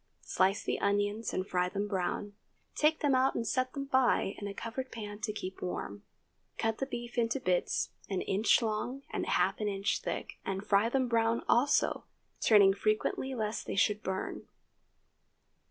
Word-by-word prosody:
Slice 190 +2 +1
the - - -1
onions 205 +2 0
and 185 +1 -2
fry 180 0 +1
them 200 +2 -2
brown. 200 +1 -2 0.4
Take 310 +1 +2
them 290 -2 +3
out 260 +1 +3
and 230 - -1
set 255 +2 0
them 275 -1 -4
by 260 -7 +2
in 205 - -4
a 200 - -5
covered 255 +3 -5
pan 210 -2 -7
to 210 0 -2
keep 190 -3 -6
warm. 100 - -4 0.6
Cut 225 -1 -1
the 270 - -1
beef 240 -1 -4
into 230 +3 +1
bits 180 -6 0 0.2
an 190 -2 -1
inch 210 +4 +3
long 230 +5 -2
and - - -2
half - - +2
an 210 - -1
inch 200 0 0
thick, - - -5
and 195 +1 -3
fry 205 +3 +3
them 260 0 +1
brown 230 0 +1
also, 270 +5 +3 0.4
turning 200 -3 +6
frequently 215 +6 -1
lest 215 -1 -3
they - - -3
should 210 +2 +2
burn. 190 -2 -4
215 Hz, 170 wpm, -31 LUFS, 200-240 Hz, 0.6 s, turning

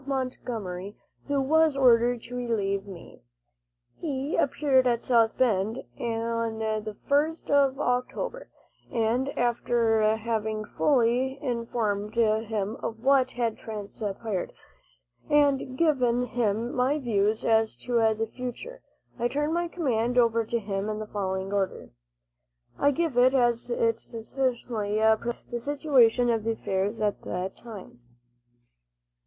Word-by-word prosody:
Montgomery, 225 -8 -4 0.3
who 285 -1 +1
was 310 +1 +3
ordered 240 -2 +4
to 245 - -8
relieve 205 -5 -1
me. 185 -4 -11 0.8
He 285 -2 -2
appeared 265 -2 +2
at 235 -1 +1
South 230 -3 +3
Bend 220 -2 +1 0.2
on 230 -1 -2
the 215 -1 -3
1st 300 +3 +1
of 275 -1 +3
October, 275 - -2 0.4
and 235 +4 0
after 235 -2 +2 0.2
having 220 -1 -2
fully 260 +1 +1
informed 230 -5 -2
him 220 -2 0
of 225 0 -6
what 265 -1 +4
had 235 -3 -2
transpired, 210 -1 -5 0.8
and 280 -3 +2
given 250 -7 +2
him 230 -1 -1
my 260 +4 +1
views 215 -5 0
as 225 -1 +2
to 245 - -3 0.2
the 225 - 0
future, 255 - -7 0.4
I 240 - +2
turned 295 +5 -1
my 345 0 0
command 250 -8 -1
over 230 -1 +4
to 235 - -1
him 200 -1 -3
in 215 - -2
the 215 - -5
following 190 -1 -3
order: 195 - -2 0.9
I 285 - +4
give 290 -3 0
it, 255 +2 +5
as 240 -2 +2
it 470 -1 +1
succinctly 230 -3 -2 0.2
presents 240 0 -5
the 240 - -2
situation 250 -4 +3
of 225 -1 -1
affairs 210 -1 -1
at 205 -1 0
the 180 +2 -4
time. 210 - -11
235 Hz, 125 wpm, -27 LUFS, 215-260 Hz, 0.9 s, it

